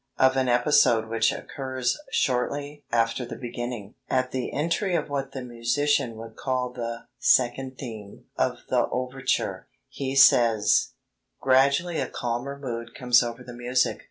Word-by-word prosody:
Of 130 Hz, 0 st, +4 dB
an 130 Hz, -1 st, +1 dB
episode 120 Hz, -2 st, +4 dB
which 115 Hz, 0 st, +2 dB
occurs 130 Hz, -2 st, -3 dB, 0.2 s
shortly 145 Hz, +3 st, -1 dB
after 115 Hz, +2 st, +1 dB
the 120 Hz, -, -7 dB
beginning 120 Hz, -3 st, -6 dB, 0.2 s
(at 130 Hz, 0 st, +1 dB
the 130 Hz, -2 st, -3 dB
entry 170 Hz, +5 st, 0 dB
of 155 Hz, -3 st, -1 dB
what 140 Hz, -1 st, -3 dB
the 130 Hz, -, -5 dB
musician 125 Hz, +2 st, 0 dB
would 115 Hz, 0 st, -10 dB
call 130 Hz, -2 st, -2 dB
the 115 Hz, -1 st, -5 dB
"second 130 Hz, +1 st, +2 dB
theme" 110 Hz, -6 st, -9 dB
of -, -, -1 dB
the -, -, +2 dB
overture), 130 Hz, +1 st, -2 dB, 0.2 s
he 135 Hz, -1 st, -4 dB
says: 115 Hz, -5 st, +5 dB, 0.5 s
"Gradually 140 Hz, +6 st, +3 dB
a 130 Hz, -, -1 dB
calmer 120 Hz, +4 st, -3 dB
mood 115 Hz, -4 st, -6 dB
comes 125 Hz, -1 st, +4 dB
over 120 Hz, +1 st, -4 dB
the 125 Hz, 0 st, -10 dB
music. 125 Hz, +1 st, 0 dB
125 Hz, 145 wpm, -26 LUFS, 120-135 Hz, 0.5 s, says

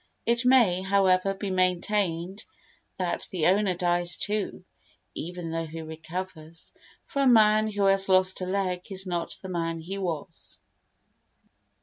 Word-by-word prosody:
It 235 Hz, +1 st, +1 dB
may, 235 Hz, -9 st, +4 dB
however, 190 Hz, 0 st, +2 dB
be 195 Hz, 0 st, -4 dB
maintained 185 Hz, 0 st, 0 dB, 0.5 s
that 180 Hz, -2 st, -1 dB
the 170 Hz, -5 st, -1 dB
owner 195 Hz, 0 st, +3 dB
dies 175 Hz, 0 st, 0 dB
too, 210 Hz, -1 st, -3 dB, 0.5 s
even 175 Hz, 0 st, -6 dB
though 165 Hz, 0 st, -3 dB
he 160 Hz, +1 st, -7 dB
recovers, 160 Hz, 0 st, -8 dB, 0.3 s
for 280 Hz, -, -2 dB
a 275 Hz, -, +4 dB
man 215 Hz, -2 st, +5 dB
who 205 Hz, -1 st, 0 dB
has 195 Hz, 0 st, +4 dB
lost 185 Hz, 0 st, +3 dB
a 185 Hz, -, -3 dB
leg 185 Hz, -2 st, -1 dB
is 190 Hz, 0 st, -2 dB
not 175 Hz, -2 st, -3 dB
the 190 Hz, -, -6 dB
man 165 Hz, -2 st, -2 dB
he 190 Hz, +5 st, -6 dB
was. 170 Hz, -6 st, -5 dB
185 Hz, 140 wpm, -27 LUFS, 175-200 Hz, 0.5 s, man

